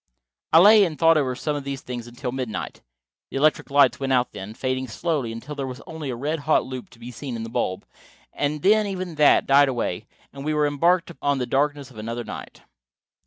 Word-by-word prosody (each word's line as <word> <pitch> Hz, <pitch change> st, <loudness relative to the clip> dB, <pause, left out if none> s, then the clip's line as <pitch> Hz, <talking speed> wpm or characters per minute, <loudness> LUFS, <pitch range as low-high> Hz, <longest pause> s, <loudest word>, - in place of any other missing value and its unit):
I 160 Hz, -, +7 dB
lay 205 Hz, +4 st, +8 dB
and 165 Hz, -5 st, -2 dB
thought 165 Hz, 0 st, +5 dB
over 135 Hz, -4 st, +1 dB
some 150 Hz, +4 st, -2 dB
of 145 Hz, -, -4 dB
these 135 Hz, -1 st, -5 dB
things 120 Hz, -2 st, -6 dB
until 125 Hz, +2 st, -5 dB
midnight. 125 Hz, -4 st, -5 dB, 0.5 s
The -, -, -4 dB
electric 150 Hz, +2 st, +2 dB
lights 140 Hz, 0 st, +4 dB
went 135 Hz, -1 st, -2 dB
out 125 Hz, -1 st, +2 dB
then, 105 Hz, +3 st, -8 dB
fading 130 Hz, +1 st, -2 dB
slowly 140 Hz, -1 st, -2 dB
until 115 Hz, +6 st, -7 dB
there 140 Hz, -2 st, -4 dB
was 125 Hz, -1 st, -7 dB
only 160 Hz, -3 st, -6 dB
a 125 Hz, -, -3 dB
red 150 Hz, +6 st, -2 dB
hot 155 Hz, +2 st, +2 dB
loop 130 Hz, -1 st, -7 dB
to 115 Hz, -, -19 dB
be 120 Hz, +1 st, -8 dB
seen 130 Hz, 0 st, -6 dB
in 115 Hz, -, -5 dB
the 115 Hz, -, -6 dB
bulb, 95 Hz, -5 st, -2 dB, 0.5 s
and 145 Hz, 0 st, -2 dB
then 215 Hz, +1 st, +4 dB
even 185 Hz, -3 st, -4 dB
that 150 Hz, -1 st, +4 dB
died 140 Hz, 0 st, +5 dB
away 115 Hz, -8 st, -3 dB, 0.3 s
and 140 Hz, -, -8 dB
we 155 Hz, +1 st, -1 dB
were 150 Hz, 0 st, +2 dB
embarked 170 Hz, +5 st, +2 dB
on 145 Hz, -1 st, +1 dB
the 125 Hz, -, -1 dB
darkness 140 Hz, +2 st, -1 dB
of 110 Hz, -, -12 dB
another 115 Hz, +2 st, -4 dB
night. -, -, -9 dB
140 Hz, 220 wpm, -24 LUFS, 125-150 Hz, 0.5 s, lay